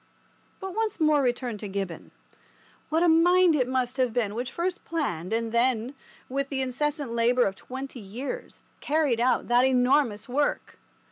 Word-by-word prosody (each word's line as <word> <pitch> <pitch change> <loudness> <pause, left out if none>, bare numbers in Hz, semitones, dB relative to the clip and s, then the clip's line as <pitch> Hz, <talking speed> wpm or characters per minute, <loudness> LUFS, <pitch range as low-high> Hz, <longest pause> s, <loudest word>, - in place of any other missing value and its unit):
But 385 -1 -6
once 440 -1 -2
more 305 -1 +4
to - - +1
return 245 -3 -1
to 210 - -5
Gibbon. 195 -3 -5 0.8
What 320 +2 +2
a - - +4
mind 345 +1 +5
it 255 -4 +1
must 255 0 -1
have 255 -3 +1
been 220 -4 0
which 245 +3 -4
first 355 +1 -3
planned, 185 - -3
and 225 0 -1
then, 240 +1 +1 0.3
with 275 +1 -2
the 265 -2 -1
incessant 285 +1 -2
labour 235 +2 +3
of 195 - -2
twenty 265 +4 -8
years, 245 - -7 0.2
carried 290 -6 +1
out 250 +2 +1
that 240 +1 +4
enormous 255 -3 +2
work! 285 +4 -1
255 Hz, 165 wpm, -26 LUFS, 235-295 Hz, 0.8 s, mind